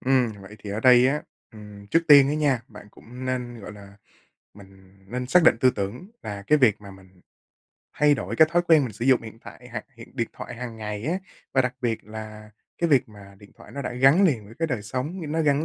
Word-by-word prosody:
Ừm, 130 -3 +2
vậy 105 +3 -12
thì 105 - -8
ở 105 +2 -3
đây 125 0 +6
á, 150 +2 -1 0.3
ừm, 105 -1 -12
trước 165 +10 +2
tiên 140 -2 +8
á 150 - 0
nha, 140 -6 +1
bạn 105 -2 -13
cũng 125 +3 -11
nên, 125 -2 -4
gọi 100 - -9
là 100 -1 -14 0.6
mình 95 -1 -17 0.2
nên 125 +1 -3
xác 180 +7 +4
định 135 - +6
tư 130 - +5
tưởng 115 - -6
là 100 -1 -6
cái 150 0 +4
việc 110 -6 +3
mà 100 - -10
mình 95 -1 -18 0.8
thay 150 0 +5
đổi - - -5
cái 160 0 +6
thói 175 0 +3
quen 155 -4 +6
mình 115 - -5
sử 115 +4 -5
dụng 130 -3 +4
hiện 110 0 -11
tại 125 +1 -13
hoặc - - -5
hiện 115 - -13
điện 115 -2 -1
thoại - - -8
hàng 120 -2 -7
ngày 105 0 -6
á. 180 +4 0 0.4
Và 130 - +4
đặc 125 0 -2
biệt 115 -2 -2
là 110 0 -9 0.3
cái 170 - +1
việc 130 -3 +3
mà 100 -2 -15
điện 100 0 -17
thoại - - -15
nó 140 - -5
đã 125 - -4
gắn 135 +9 +5
liền 125 - +1
với 115 - -14
cái 165 - 0
đời 120 -6 -3
sống, 130 - -4
nó 160 0 0
gắn 145 +1 +2
120 Hz, 240 wpm, -24 LUFS, 105-135 Hz, 0.8 s, tiên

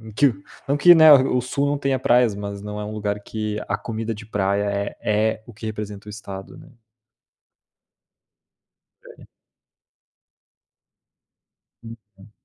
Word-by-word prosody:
em 110 0 -11
que 135 +2 +3 0.3
não 140 - +2
que, 175 +4 +8
né, 160 -1 +9
o 130 -2 +4
o 125 - -1
Sul 140 +3 -1
não 145 0 0
tenha 135 -2 0
praias, 120 -3 +3
mas 100 0 -6
não 105 0 -6
é - - -4
um 105 - -6
lugar 105 -1 -3
que 105 0 -4
a 105 - 0
comida 115 0 -4
de 110 +1 -11
praia 100 -1 0
é 100 0 -3
é 110 +1 0
o 120 - -13
que 110 - -11
representa 105 -1 -6
o - - -6
estado, 100 -2 -9
né. 150 -1 -15 2.4
É. - - -15 2.6
Uhum. 105 -2 -14
110 Hz, 150 wpm, -22 LUFS, 105-125 Hz, 2.6 s, né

